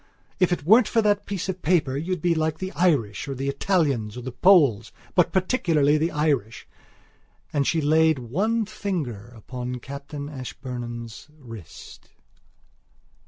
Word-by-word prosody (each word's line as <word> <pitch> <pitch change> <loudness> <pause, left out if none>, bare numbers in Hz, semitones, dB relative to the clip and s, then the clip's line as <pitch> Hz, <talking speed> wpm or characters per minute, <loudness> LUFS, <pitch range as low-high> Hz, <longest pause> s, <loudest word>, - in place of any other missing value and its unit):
If 180 -1 +3
it 175 - -1
weren't 220 - +6
for 225 -2 +2
that 205 -1 +1
piece 195 -3 -3
of 185 -1 -4
paper 150 -6 +1
you'd 165 +3 -3
be 175 -1 +3
like 160 -1 -1
the 185 +2 -5
Irish 140 - +1
or 135 - -4
the 135 +2 -4
Italians 140 - 0
or - - -5
the 130 - -5
Poles, 140 - +4 0.2
but - - +3
particularly 170 - +2
the 160 +2 +1
Irish...." 145 - -1 0.9
And 140 -2 +1
she 165 - +1
laid 160 +1 +3
one 200 - -1
finger 155 - -4
upon 125 +3 -6
Captain 140 +3 -7
Ashburnham's 120 -4 -7
wrist. 115 - -12
150 Hz, 145 wpm, -24 LUFS, 125-180 Hz, 0.9 s, weren't